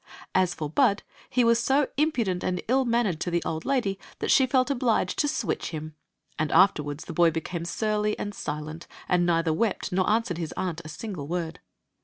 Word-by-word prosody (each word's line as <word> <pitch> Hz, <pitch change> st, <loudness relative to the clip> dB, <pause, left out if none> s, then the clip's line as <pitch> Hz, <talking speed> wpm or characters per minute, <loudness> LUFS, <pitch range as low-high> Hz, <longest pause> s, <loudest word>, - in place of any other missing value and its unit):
As 185 Hz, -1 st, +2 dB
for 155 Hz, -, -3 dB
Bud, 200 Hz, +6 st, +2 dB, 0.3 s
he 250 Hz, -, +2 dB
was 235 Hz, 0 st, +4 dB
so 270 Hz, +3 st, +3 dB
impudent 235 Hz, -, 0 dB
and 180 Hz, -1 st, -1 dB
ill 260 Hz, +3 st, +3 dB
mannered 230 Hz, -8 st, +1 dB
to 175 Hz, -, -2 dB
the 170 Hz, 0 st, 0 dB
old 160 Hz, 0 st, -3 dB
lady 230 Hz, -8 st, 0 dB, 0.2 s
that -, -, -1 dB
she 265 Hz, -, +5 dB
felt 255 Hz, +1 st, +2 dB
obliged 245 Hz, -4 st, +1 dB
to 295 Hz, -, +3 dB
switch 295 Hz, -, -2 dB
him; 155 Hz, -1 st, -6 dB, 0.5 s
and 155 Hz, -1 st, 0 dB
afterward 150 Hz, -6 st, +3 dB
the -, -, -7 dB
boy 170 Hz, +1 st, +5 dB
became 165 Hz, +1 st, -4 dB
surly 210 Hz, +3 st, 0 dB
and 205 Hz, -, -4 dB
silent, 155 Hz, 0 st, -5 dB, 0.2 s
and 175 Hz, -1 st, +2 dB
neither 165 Hz, -1 st, +2 dB
wept 210 Hz, +4 st, -1 dB
nor 185 Hz, 0 st, +1 dB
answered 215 Hz, -6 st, +1 dB
his 160 Hz, -3 st, -4 dB
aunt 175 Hz, -3 st, -2 dB
a 170 Hz, -, -13 dB
sin^e 155 Hz, -1 st, -6 dB
word. 165 Hz, -1 st, -3 dB
185 Hz, 195 wpm, -26 LUFS, 165-230 Hz, 0.5 s, she